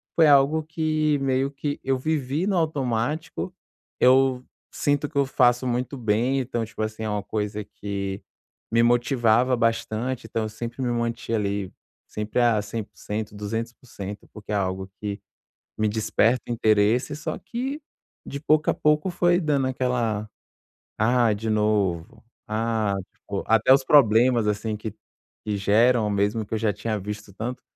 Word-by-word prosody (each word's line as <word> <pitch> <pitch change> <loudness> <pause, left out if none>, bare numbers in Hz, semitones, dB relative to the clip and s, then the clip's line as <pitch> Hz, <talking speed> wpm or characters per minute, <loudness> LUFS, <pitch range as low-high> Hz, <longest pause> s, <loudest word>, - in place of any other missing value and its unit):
foi 160 -2 +6
algo 145 +2 +5
que, 155 -2 0
meio 135 0 0
que, 145 +1 -4
eu 135 0 +1
vivi 150 +3 -1
no 200 - +1
automático. 150 +3 -1 0.5
Eu 130 0 +4 0.3
sinto 145 0 0
que 150 - -6
eu 140 - +4
faço 125 -1 +3
muito 125 +3 -2
bem, 120 +4 +1
então, 120 -3 -2
tipo 110 0 -8
assim, 110 0 -3
é 110 - -2
uma 105 -1 -2
coisa 105 0 -3
que 100 -1 -5 0.5
me 115 0 +4
motivava 120 0 +3
bastante, 115 +1 -1
então 115 0 -2
eu 110 - -3
sempre 120 +4 -6
me 120 -1 0
mantinha, 115 0 -2
ali, 100 -2 -2 0.4
sempre, 105 +3 -3
ah, 115 -3 +3
100%,, 105 0 -5
200%, 105 -1 -6
porque 105 0 -9
é - - +1
algo 95 -1 -2
que 105 -1 -4 0.6
me 110 0 +1
desperta 110 +3 +1
interesse, 110 +5 +2
só 155 +1 -4
que, 265 +6 -4 0.4
de 140 - -6
pouco 150 0 +2
a - - -1
pouco, 150 +4 +2
foi 175 0 +3
dando 145 -6 +1
aquela: 120 -5 -1 0.7
"Ah, 120 0 +3
de 110 +2 -3
novo. 105 -6 0 0.2
Ah", 110 -2 0 0.2
tipo, 100 -1 -5
até 110 +3 +5
os 135 0 +5
problemas, 120 -3 +5
assim, 105 +1 -1
que 110 0 -6 0.5
que 105 -1 -1
geram 110 +3 +3
mesmo, 105 +2 0
que 110 - -4
eu - - 0
já 105 -1 +1
tinha 105 +1 -3
visto 105 +1 -7
tanto 120 +4 -5
115 Hz, 155 wpm, -24 LUFS, 105-135 Hz, 0.7 s, foi